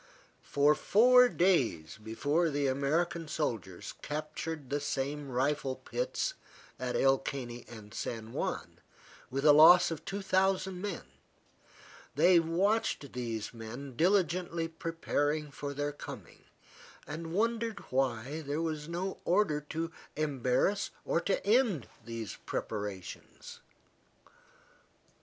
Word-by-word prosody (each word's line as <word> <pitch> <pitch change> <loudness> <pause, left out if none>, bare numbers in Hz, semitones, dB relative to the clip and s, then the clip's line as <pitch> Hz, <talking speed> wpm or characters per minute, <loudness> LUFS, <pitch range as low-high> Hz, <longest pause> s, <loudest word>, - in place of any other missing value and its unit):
For 145 +1 +3
four 250 +8 +6
days 115 - +1
before 145 +10 +1
the 145 -1 0
American 155 +5 0
soldiers 110 - -3
captured 155 -1 -5
the 145 - +1
same 145 0 -3
rifle 135 +1 0
pits - - -2 0.5
at 125 -1 -2
El 135 0 +4
Caney 120 -4 -5
and 110 -2 -11
San 115 -1 -5
Juan, - - -3 0.5
with 135 +3 -2
a 150 - +9
loss 165 +4 +8
of 160 -1 -5
two 195 +2 -4
thousand 190 -1 +1
men, 200 -4 -4 1.1
they 170 +4 +6
watched 170 - 0
these 115 -3 -4
men 120 +4 -8
diligently 175 0 +1
preparing 155 -2 -2
for 145 0 -5
their 145 +1 -2
coming, 145 - -10 0.6
and 160 +2 -6
wondered 230 0 0
why 130 +3 0
there 145 +1 -3
was 155 -1 -3
no 180 +3 -3
order 175 -5 +2
to 165 +1 -3 0.2
embarrass 145 +6 +1 0.2
or 165 - +1
to 195 - -1
end 210 - +3 0.2
these 115 -2 -6
preparations. 100 -4 -5
150 Hz, 115 wpm, -31 LUFS, 130-175 Hz, 1.1 s, a